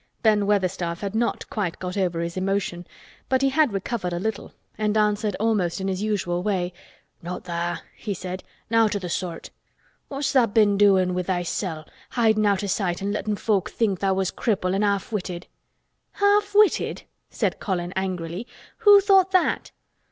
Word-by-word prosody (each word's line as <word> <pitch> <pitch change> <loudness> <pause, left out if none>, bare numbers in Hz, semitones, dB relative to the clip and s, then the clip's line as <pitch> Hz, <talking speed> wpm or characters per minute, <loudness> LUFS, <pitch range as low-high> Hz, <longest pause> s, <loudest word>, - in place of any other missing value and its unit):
Ben 210 -3 +3
Weatherstaff 185 -4 0
had 200 -1 -3
not 235 +2 -1
quite 190 -6 -2
got 180 0 -5
over 180 -4 0
his 170 0 -4
emotion, 185 -2 -2 0.4
but 260 0 +2
he 270 - +4
had 295 -1 +3
recovered 195 -2 -3
a 175 - -2
little 220 +3 -3 0.2
and 215 0 0
answered 210 -1 +1
almost 210 -6 +1
in 190 - -2
his 190 0 -2
usual 190 -5 -1
way. 185 -3 -1 0.5
"Not 175 +2 -6
tha'," 175 0 -3
he 205 -3 -4
said. 185 +1 -6 0.3
"Nowt 225 -2 +3
o' - - 0
th' 180 -3 -5
sort. 175 -2 -4 0.6
What's 275 0 -2
tha' 255 -4 +5
been 205 -1 +3
doin' 190 -3 +4
with 180 -1 -2
thysel'—hidin' 190 +5 -1
out 200 -1 +1
o' - - -2
sight 190 -2 -1
an' 200 - -1
lettin' 210 0 -1
folk 205 -2 0
think 200 -6 0
tha' 195 -1 +1
was 190 -1 0
cripple 190 -5 0
an' 195 - +1
half 200 -1 0
witted?" 180 -4 -4 0.7
"Half 405 0 +2
witted!" 420 -1 +3 0.3
said - - -1
Colin 180 -3 -2
angrily. 185 +2 -3 0.3
"Who 410 -3 +8
thought 385 -2 +5
that?" 370 - +2
200 Hz, 170 wpm, -24 LUFS, 180-220 Hz, 0.7 s, Who